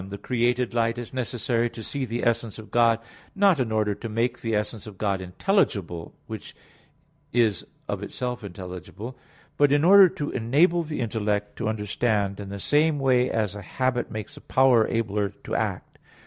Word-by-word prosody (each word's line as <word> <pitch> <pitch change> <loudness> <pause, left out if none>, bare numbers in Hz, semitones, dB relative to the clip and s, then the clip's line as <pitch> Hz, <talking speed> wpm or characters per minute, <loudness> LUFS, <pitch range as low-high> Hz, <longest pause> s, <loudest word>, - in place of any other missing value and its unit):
1: 95 - -9
The 100 - -6
created 120 +3 0
light 115 0 +1
is 120 +1 -7
necessary 120 -1 0
to 115 - -9
see 140 +2 -3
the 120 +1 -3
essence 115 -2 0
of 110 -1 -11
God, 115 -1 +4 0.4
not 195 -5 +4
in 120 -4 0
order 105 -1 +1
to 115 +3 -7
make 120 +3 -1
the 115 -2 -1
essence 105 0 -3
of 100 -3 -10
God 100 -2 0
intelligible, 95 - -1
which - - -8 0.8
is 115 -6 +2 0.2
of - - -3
itself 125 -2 -4
intelligible, 95 +5 -8 0.4
but 145 -1 +4
in 145 +1 +3
order 195 +1 +8
to 150 -5 -4
enable 150 +9 +3
the 150 -4 -4
intellect 105 -3 -1
to 115 - -1
understand 105 -1 -1
in 100 -1 -6
the 100 0 -6
same 150 +7 +2
way 130 -2 +3
as 105 -3 0
a 105 - -7
habit 125 +5 -1
makes 110 -1 -6
a - - -12
power 130 -4 +4
abler 105 -3 0
to - - -6
act. - - -2
115 Hz, 180 wpm, -25 LUFS, 105-130 Hz, 0.8 s, order